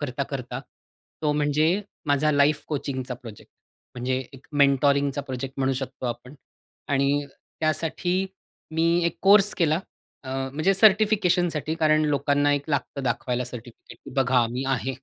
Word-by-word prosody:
करता, 140 -2 -3
करता. 130 -2 -5 0.6
तो 150 -1 +2
म्हणजे 150 +1 +2 0.4
माझा 145 +1 +2
लाईफ 145 +1 +3
कोचिंगचा 135 -4 -3
प्रोजेक्ट. 115 -4 -12 0.4
म्हणजे 125 +1 -1
एक 135 -1 -15 0.2
मेन्टॉरिंगचा 140 0 +3
प्रोजेक्ट 130 -1 -6
म्हणू 135 0 +1
शकतो 130 -1 -5
आपण. 120 +3 -6 0.5
आणि 140 +1 +1 0.4
त्यासाठी 175 +4 0 0.5
मी 165 +1 +2 0.2
एक - - -3
कोर्स 200 +1 +6
केला. 160 -2 +2 0.5
अ, - - -9 0.2
म्हणजे 155 +7 +2
सर्टिफिकेशनसाठी 185 -7 +3
कारण 155 -1 +3
लोकांना 145 0 +2
एक 145 +2 -2
लागतं 140 0 -2
दाखवायला 125 0 -1
सर्टिफिकेट 120 -1 -10
की - - -9
बघा 125 -2 +3
मी 125 +3 -3
आहे 135 0 -1
140 Hz, 135 wpm, -25 LUFS, 130-155 Hz, 0.6 s, कोर्स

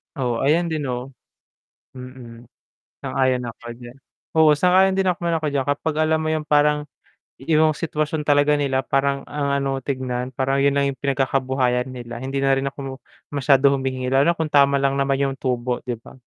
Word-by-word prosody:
Oo, 125 -4 -1
ayan 165 +4 +1
din 155 - -1
no. 125 +2 -4 0.8
Mm. 125 -2 -11 0.6
Sang-ayon 130 -2 0
ako 115 - -14 0.2
diyan, 120 +1 -12 0.4
oo, 160 -1 +6
sang-ayon 185 +3 +4
din 190 - +1
naman 170 -1 -1
ako 155 -2 -2
diyan 135 -2 0
kapag 150 +2 -1
alam 160 0 +2
mo 155 - -1
yung 155 -1 -2
parang 150 0 +3 0.6
iyong 155 +1 +3
sitwasyon 155 -1 -2
talaga 145 0 +4
nila 135 -2 0
parang 140 0 0
ang 145 -1 -2
ano 135 -1 -1
tignan, 130 -2 -3
parang 135 +1 0
yun 140 - +4
lang 140 0 +2
yung 130 - -12
pinagkakabuhayan 130 -2 0
nila, 120 -2 -8
hindi 135 +1 -3
na 135 0 +3
rin 135 +1 -2
ako 135 -1 -8 0.3
masyado 140 0 +4
humingi 130 -1 -2
lalo 140 +5 +4
kung 160 -1 -1
tama 140 -1 +4
lang 135 0 +1
naman 135 0 +1
yung - - -6
tubo 125 -1 -1
'di 120 -1 -3
ba? - - -14
135 Hz, 175 wpm, -22 LUFS, 130-150 Hz, 0.8 s, oo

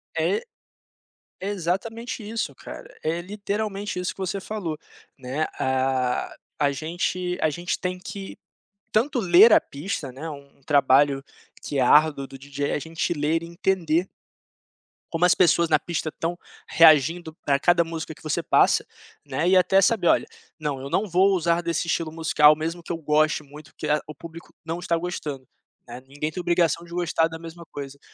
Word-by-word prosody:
É, 440 +4 0 1.0
é 195 - -3
exatamente 205 +5 -3
isso 225 +1 -3
cara, - - -10 0.2
é 165 +2 0
literalmente 205 0 -4
isso 180 - -2
que - - -31
você 190 +1 -2
falou, 180 -8 -4 0.4
né, 135 +5 -2
a 130 -1 0 0.2
a 145 -1 +3
gente 175 +4 -2
a 155 - +3
gente 175 +4 -3
tem 180 0 -3
que 195 +1 -8 0.5
tanto 250 +6 +1
ler 190 +3 +7
a - - +8
pista, 145 - -5
né, 150 +6 -7
um 140 -1 -12
um - - -30
trabalho 140 0 +3 0.4
que 140 - -3
é - - +3
árduo 145 +1 +4
do 135 - -11
DJ 140 +1 -4
é - - 0
a - - -1
gente 165 +2 -2
ler 155 +1 0
e 170 - -8
entender 175 -1 0 1.0
como 165 +1 +2
as 180 - +5
pessoas 170 -1 +3
na - - +4
pista 165 -2 -3
estão 170 +3 -4 0.3
reagindo 160 +1 +5
para 140 -1 +2
cada 175 +2 +4
música 165 -1 -6
que - - -19
você 155 - -1
passa, - - +3 0.4
né, 170 +3 0
e 185 - +6
até 190 +2 +4
saber: 190 -3 +2
"Olha, - - +3 0.3
não, 145 -3 -3
eu 135 - -6
não 205 +8 0
vou 190 +2 +3
usar 170 0 +1
desse 170 0 -2
estilo 165 -1 -1
musical 155 -2 +5
mesmo 165 +3 -4
que - - -7
eu 165 - -2
goste 155 0 +1
muito, 145 +1 -14
porque 155 - -6
a 150 0 +2
o 155 - -9
público 165 +3 -12
não 165 +2 -3
está 170 -1 0
gostando", 150 -6 -5 0.4
né, 120 +1 -9
ninguém 145 +3 -4
tem 180 - -5
obrigação 170 -1 +1
de 170 - -16
gostar 170 -2 +1
da 160 0 -8
mesma 165 +1 -10
coisa. 140 -1 -8
165 Hz, 180 wpm, -24 LUFS, 150-180 Hz, 1.0 s, a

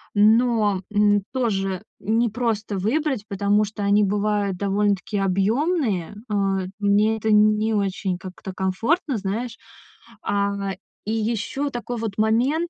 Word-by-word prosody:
но, 215 -2 +4
м, 205 -1 +3
тоже 195 -7 -1 0.2
непросто 220 -1 0
выбрать, 255 +3 0
потому 205 +1 +2
что 205 0 -6
они 205 +1 +4
бывают 205 -1 0
довольно-таки 200 +1 0
объёмные. 205 - 0 0.2
Э, 195 -2 0
мне 210 +2 +3
это 220 +1 -2
не 215 +1 +4
очень, 195 -2 -1
как-то, 185 0 -8
комфортно, 230 - 0
знаешь. 220 +4 -3 0.7
А 200 0 0 0.5
и 215 - -2
ещё 230 +6 -1
такой, 245 -1 -5
вот, 220 -3 -4
момент, 250 +10 +2
210 Hz, 120 wpm, -23 LUFS, 200-230 Hz, 0.7 s, но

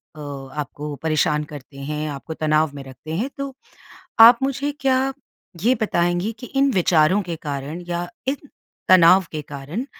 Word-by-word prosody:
अ, - - -12
आपको 145 +1 -6
परेशान 150 -1 +1
करते 145 -2 -11
हैं, 150 +2 -4
आपको 145 +3 -6
तनाव 155 -1 +1
में 140 - -8
रखते 135 +4 -9
हैं 235 +10 -1
तो, 275 -1 -4 0.7
आप 235 +1 +10
मुझे 275 +2 -1
क्या 265 0 +2 0.5
ये 245 +4 +4
बताएँगी 175 +1 +1
कि 245 - -7
इन 275 0 +3
विचारों 175 +1 +3
के 170 -2 -4
कारण 145 +4 -4
या 175 0 -3 0.2
इन 270 +1 +1 0.5
तनाव 185 +1 +7
के 155 - -3
कारण 145 - -6
160 Hz, 155 wpm, -22 LUFS, 150-220 Hz, 0.7 s, आप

